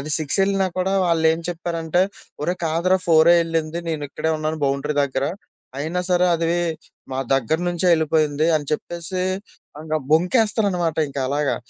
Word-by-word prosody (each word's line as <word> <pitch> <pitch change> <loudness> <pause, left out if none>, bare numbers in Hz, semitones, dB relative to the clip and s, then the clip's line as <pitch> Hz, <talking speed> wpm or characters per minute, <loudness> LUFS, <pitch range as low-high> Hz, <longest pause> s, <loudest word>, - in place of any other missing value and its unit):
అది 150 +3 -6
6 155 +4 -1
ఎళ్ళినా 195 -1 +1
కూడా 190 +1 0
వాళ్ళు 165 -1 +1
ఏం 165 - -3
చెప్పారంటే, 170 0 -1 0.4
ఒరేయ్ 175 +4 -2
కాదురా 170 +4 +2
ఫోరే 165 +1 +6
ఎళ్ళింది 165 0 -2
నేను 155 -2 -2
ఇక్కడే 155 +3 -2
ఉన్నాను 155 +1 -3
బౌండరీ 140 +2 -1
దగ్గర 135 -1 -1 0.5
అయినా 160 +5 -2
సరే 180 0 +4
అది 165 0 -1 0.7
మా 130 - -3
దగ్గర 135 +4 +1
నుంచే 175 +1 -1
ఎళ్ళిపోయింది 155 -1 +1
అని 145 - -4
చెప్పేసి 175 +4 -3 0.6
ఇంకా 155 0 -1
బొంకేస్తారనమాట 180 -1 +2
ఇంక 140 0 -7
అలాగా. 145 +1 0
160 Hz, 150 wpm, -22 LUFS, 155-175 Hz, 0.7 s, ఫోరే